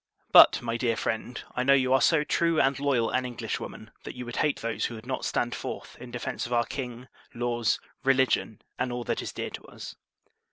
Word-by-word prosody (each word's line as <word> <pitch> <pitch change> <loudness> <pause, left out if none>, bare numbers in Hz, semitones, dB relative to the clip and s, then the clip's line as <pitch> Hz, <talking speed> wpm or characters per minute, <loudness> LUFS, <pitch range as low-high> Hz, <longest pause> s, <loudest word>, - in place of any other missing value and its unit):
But, - - +8
my 115 -1 -1
dear 115 -2 0
friend, 110 +3 -3 0.2
I 125 - 0
know 140 +2 +5
you 130 -1 +2
are 135 - +4
so 160 -3 +4
true 165 +1 +1
and 135 0 +2
loyal 130 -5 +1
an 130 - +1
Englishwoman, 125 -2 -5
that - - -7
you 125 0 -6
would 120 - -6
hate 150 -2 +1
those 115 0 -1
who 120 - -4
would 110 +1 -10
not 130 0 -3
stand 120 0 0
forth - - -6
in 125 - -8
defence 120 0 -4
of 120 - -4
our 120 0 +3
King, 125 -2 -6 0.3
laws, 120 -1 0 0.2
religion, 130 -5 +2 0.2
and 125 0 -1
all 120 0 -3
that - - -2
is - - -5
dear - - -5
to - - -8
us. - - -9
125 Hz, 215 wpm, -27 LUFS, 120-130 Hz, 0.3 s, But